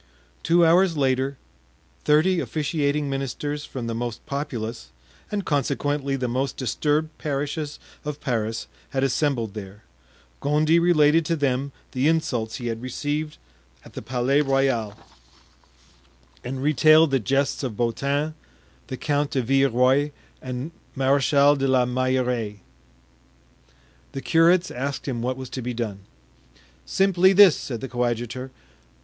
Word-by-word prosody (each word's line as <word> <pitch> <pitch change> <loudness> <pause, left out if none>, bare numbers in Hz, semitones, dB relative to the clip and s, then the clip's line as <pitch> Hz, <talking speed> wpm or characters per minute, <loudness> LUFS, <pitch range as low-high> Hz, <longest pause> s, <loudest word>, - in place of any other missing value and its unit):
Two 170 0 +4
hours 170 0 +4
later, 135 0 0 0.7
thirty 160 +5 +4
officiating 150 -2 -1
ministers 140 +2 -3
from 125 -3 -6
the 115 - -3
most 120 0 -5
populous, 120 - -5 0.4
and 205 -3 -2
consequently 140 0 0
the 130 -2 -2
most 130 +3 -2
disturbed 150 +5 -1
parishes 145 +1 -3 0.3
of 150 -1 -5
Paris 115 -3 -2 0.2
had 135 0 -1
assembled 130 -5 0
there. 105 0 -9 0.6
Gondy 155 +3 +3
related 165 -2 +4
to 165 - +1
them 140 -2 -1 0.2
the 130 +2 +1
insults 125 -9 0
he 125 - -6
had 115 -1 -3
received 145 +4 -3 0.5
at - - -14
the - - -6
Palais 130 +3 +1
Royal 135 -7 0 1.5
and 130 +1 -4
retailed 155 +1 +5
the 135 - +3
jests 135 +4 0
of 125 -7 -4
Beautin, 140 +6 -1 0.5
the 130 - -5
Count 145 0 0
de 130 - -1
Villeroy 135 +2 +3 0.3
and 130 +4 -5 0.2
Marechal 140 +1 +4
de 135 -1 0
la 130 -2 +3
Meilleraie. 125 -4 -1 1.5
The 135 - -4
curates 170 +4 +3
asked 135 +3 -4
him 120 -4 -2
what 125 +2 -2
was 130 -1 -8
to 130 - -4
be 125 0 -4
done. 110 -4 -3 0.9
"Simply 190 - +4
this," 195 -4 +8
said 120 -4 -5
the 135 - -4
coadjutor. 120 +1 -2
135 Hz, 130 wpm, -24 LUFS, 125-150 Hz, 1.5 s, this